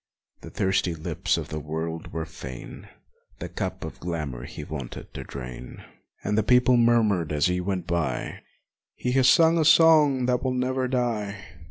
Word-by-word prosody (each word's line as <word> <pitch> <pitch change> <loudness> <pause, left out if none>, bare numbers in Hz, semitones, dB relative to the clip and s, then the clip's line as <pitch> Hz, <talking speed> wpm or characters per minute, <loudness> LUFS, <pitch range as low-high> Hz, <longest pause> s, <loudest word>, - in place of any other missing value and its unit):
The - - -9
thirsty 95 -3 0
lips 80 - -1
of - - -5
the 75 - -4
world 80 +2 -5
were 80 -1 -3
fain 65 -6 -9 0.5
The - - -6
cup - - -4
of - - -9
glamor 75 -8 -4
he - - -8
vaunted 65 -3 -7
to - - -6
drain. 65 -2 -9 0.4
And 105 - 0
the 110 - +3
people 125 +3 +4
murmured 110 -9 +3
as 75 +2 +1
he 90 0 +1
went 95 -1 -2
by, 85 -1 -2 0.6
"He 125 - -2
has 130 0 +4
sung 165 +4 +5
a - - +3
song 155 -5 +5
that 125 -1 +1
will 130 -1 -1
never 130 +1 0
die 115 -6 -1
100 Hz, 170 wpm, -25 LUFS, 80-125 Hz, 0.6 s, sung